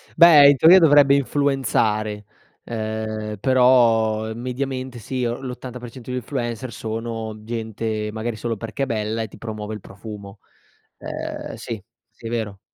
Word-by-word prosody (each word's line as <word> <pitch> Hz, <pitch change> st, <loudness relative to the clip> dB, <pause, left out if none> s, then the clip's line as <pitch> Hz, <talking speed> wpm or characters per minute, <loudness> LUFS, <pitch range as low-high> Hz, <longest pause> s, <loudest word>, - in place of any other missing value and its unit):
Beh, 155 Hz, -4 st, +9 dB
in 145 Hz, -, +5 dB
teoria 175 Hz, +6 st, +8 dB
dovrebbe 145 Hz, -4 st, +6 dB
influenzare, 110 Hz, -7 st, 0 dB, 0.4 s
ehm, 110 Hz, -1 st, -4 dB
però 115 Hz, -4 st, +3 dB
mediamente 130 Hz, +1 st, -4 dB
sì 130 Hz, +2 st, -4 dB
o 120 Hz, +2 st, -2 dB
l'80% 125 Hz, -1 st, -8 dB
di 125 Hz, -, -2 dB
influencer 120 Hz, -1 st, -4 dB
sono 110 Hz, -1 st, -5 dB
gente, 110 Hz, -1 st, -3 dB
magari 110 Hz, +1 st, -4 dB
solo 115 Hz, 0 st, -3 dB
perché 115 Hz, +6 st, -4 dB
è -, -, +2 dB
bella 110 Hz, -1 st, -2 dB
e 110 Hz, -, -3 dB
ti -, -, -15 dB
promuovo 110 Hz, -1 st, -6 dB
il 105 Hz, -, -6 dB
profumo. 100 Hz, 0 st, -10 dB, 0.6 s
Ehm, -, -, -6 dB
sì, 110 Hz, -4 st, -6 dB, 0.3 s
sì 115 Hz, 0 st, -11 dB
è -, -, -4 dB
vero. 110 Hz, -4 st, -3 dB
115 Hz, 140 wpm, -22 LUFS, 110-130 Hz, 0.6 s, Beh